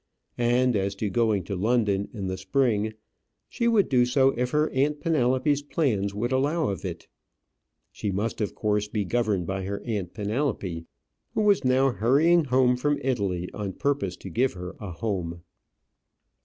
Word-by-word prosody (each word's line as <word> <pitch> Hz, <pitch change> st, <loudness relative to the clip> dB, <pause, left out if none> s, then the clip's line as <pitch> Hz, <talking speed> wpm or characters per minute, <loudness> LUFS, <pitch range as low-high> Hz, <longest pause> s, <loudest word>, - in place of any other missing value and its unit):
And 120 Hz, +1 st, +3 dB
as 100 Hz, 0 st, 0 dB
to 100 Hz, 0 st, -2 dB
going 110 Hz, -3 st, +1 dB
to 100 Hz, -, -4 dB
London 105 Hz, -1 st, +1 dB
in 100 Hz, -4 st, -5 dB
the 95 Hz, 0 st, -2 dB
spring, 110 Hz, +2 st, 0 dB, 0.5 s
she 235 Hz, -, -1 dB
would 220 Hz, -5 st, +4 dB
do 125 Hz, -2 st, +4 dB
so 130 Hz, +2 st, +3 dB
if 125 Hz, +1 st, -1 dB
her 150 Hz, +3 st, +1 dB
aunt 145 Hz, +3 st, +1 dB
Penelope's 145 Hz, -2 st, +1 dB
plans 125 Hz, -10 st, 0 dB
would 120 Hz, +4 st, -1 dB
allow 145 Hz, +3 st, +1 dB
of 100 Hz, -, -4 dB
it. 90 Hz, -3 st, -6 dB, 0.8 s
She 105 Hz, -, -4 dB
must 105 Hz, +4 st, -2 dB
of 105 Hz, -, -2 dB
course 105 Hz, -1 st, 0 dB
be 105 Hz, -1 st, -2 dB
governed 105 Hz, -4 st, 0 dB
by 95 Hz, +2 st, -3 dB
her 100 Hz, +1 st, -3 dB
aunt 100 Hz, -6 st, -3 dB
Penelope, 105 Hz, -, -2 dB, 0.5 s
who -, -, +2 dB
was 200 Hz, -8 st, +4 dB
now 130 Hz, +1 st, +3 dB
hurrying 145 Hz, -, +3 dB
home 125 Hz, -1 st, +3 dB
from 145 Hz, +3 st, +1 dB
Italy 100 Hz, -9 st, -1 dB
on 100 Hz, -3 st, -4 dB
purpose 140 Hz, -10 st, -1 dB
to 95 Hz, -, -9 dB
give 130 Hz, +9 st, +1 dB
her 90 Hz, -1 st, -7 dB
a 105 Hz, -, -6 dB
home. 85 Hz, -3 st, -4 dB
115 Hz, 170 wpm, -26 LUFS, 100-135 Hz, 0.8 s, would